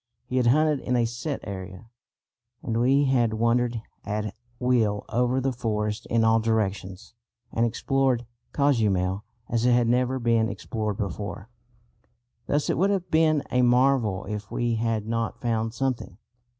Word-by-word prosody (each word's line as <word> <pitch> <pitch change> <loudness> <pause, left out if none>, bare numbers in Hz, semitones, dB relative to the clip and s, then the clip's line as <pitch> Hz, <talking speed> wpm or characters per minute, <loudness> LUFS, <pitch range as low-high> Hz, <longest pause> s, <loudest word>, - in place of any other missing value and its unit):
] - - -51
He 130 - +1
had 125 -2 +3
hunted 150 +3 +3
in 125 - -1
a 120 -1 +3
set 120 +5 -4
area, 95 +2 -8 0.7
and 115 0 -1
we 135 +3 +4
had 120 -5 +2
wandered 115 0 +1 0.2
at 105 +1 -3 0.2
will 115 -5 +1
over 125 +2 +1
the 135 +1 0
forest 105 -3 -2
in 115 -1 +2
all 115 0 +4
directions 105 -3 -2 0.4
and 115 +1 +2
explored 130 +1 0 0.3
Cozumel 105 -9 +1 0.2
as 115 0 0
it 125 - +5
had 120 -1 +3
never 125 +2 +2
been 115 -2 +2
explored 110 -4 -3
before. 100 0 -5 1.0
Thus 145 +1 +1
it - - 0
would 195 +2 +3
have 185 -3 -1
been 155 -2 +3
a 125 0 +3
marvel 125 -5 +3
if 105 0 -5
we 120 -1 -1
had 115 -1 -1
not 115 0 -2
found 115 -2 -1
something. 125 -7 -2
115 Hz, 155 wpm, -26 LUFS, 110-125 Hz, 1.0 s, it